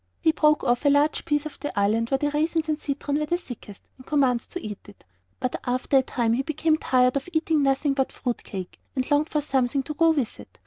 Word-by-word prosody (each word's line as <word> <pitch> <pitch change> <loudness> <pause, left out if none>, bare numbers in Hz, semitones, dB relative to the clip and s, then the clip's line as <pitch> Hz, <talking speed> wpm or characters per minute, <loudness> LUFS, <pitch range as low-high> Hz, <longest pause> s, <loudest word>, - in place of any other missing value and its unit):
He 320 - +3
broke 300 -1 +3
off 240 0 +1
a 290 - +5
large 290 +2 +2
piece 295 -2 0
of 305 - -8
the 290 -8 -3
island 220 +3 +1
where 270 - +2
the 290 +1 -1
raisins 315 +2 0
and 305 -1 -1
citron 285 +1 -2
were 300 - -2
thickest, 255 - -5 0.2
and 260 - -15
commenced 260 -5 +1
to 360 - -3
eat 210 - -6
it. 205 - -16 0.4
But 255 - -1
after 255 +2 +1
a - - +6
time 235 -3 0
he 250 - +1
became 310 +2 +1
tired 255 -3 +2
of 275 +5 -2
eating 315 -1 +2
nothing 275 +1 +2
but 270 -1 0
fruit 245 -2 -4
cake, 185 -3 -7 0.2
and 260 +2 -2
longed 290 +2 +3
for 300 - 0
something 270 -1 0
to 300 - -5
go 330 +2 +4
with 285 -8 0
it. - - -14
280 Hz, 235 wpm, -25 LUFS, 250-305 Hz, 0.4 s, a